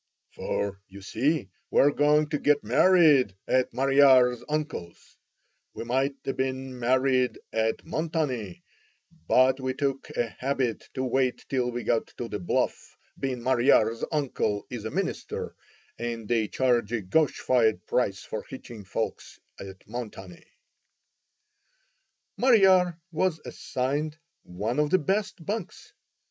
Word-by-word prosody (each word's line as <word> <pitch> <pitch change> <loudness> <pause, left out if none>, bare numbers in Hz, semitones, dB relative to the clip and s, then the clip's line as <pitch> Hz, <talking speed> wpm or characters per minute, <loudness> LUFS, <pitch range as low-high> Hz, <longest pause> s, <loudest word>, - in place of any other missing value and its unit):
"For, 100 -1 -3
you 95 +1 -12
see, 130 - -1 0.2
we're 145 - +4
goin' 150 +1 +3
to 150 -1 -1
git 145 0 +2
married 140 - +5
at 130 -1 +2
Mariar's 130 -3 +4
uncle's. 150 - -3 0.8
We - - -5
might 135 +4 0
a 135 - -1
bin 130 -1 -3
married 130 +1 +2 0.2
at 110 0 0
Montanny, 155 - -3 0.6
but 130 +1 +4
we 130 -1 -2
took 135 -1 -2
a 120 - 0
habit 130 -3 -2
to 130 - -1
wait 130 0 0
till 125 -2 0
we 120 0 -4
got 115 -2 0
to 120 - -4
the 105 - -4
Bluff, 90 - -2 0.2
bein' 130 -3 -3
Mariar's 120 -3 +3
uncle 135 -9 -1
is - - -6
a - - -2
minister, - - -3 0.5
and 115 -2 -4
they 115 -2 +1
charge 120 -4 +1
a 115 - 0
gosh 145 +11 +1
fired 110 -7 +2
price 100 -6 0
for 110 - -5
hitchin' 120 -5 -9
folks 95 - -4 0.2
at 95 -1 -10
Montanny." 105 -6 -8 1.9
"Mariar" 190 -8 +4
was 165 0 0
assigned 145 +4 -3 0.2
one 105 +9 -3
of 150 0 +2
the 185 - +4
best 195 +1 -2
"bunks." 220 - -5
130 Hz, 130 wpm, -27 LUFS, 115-150 Hz, 1.9 s, married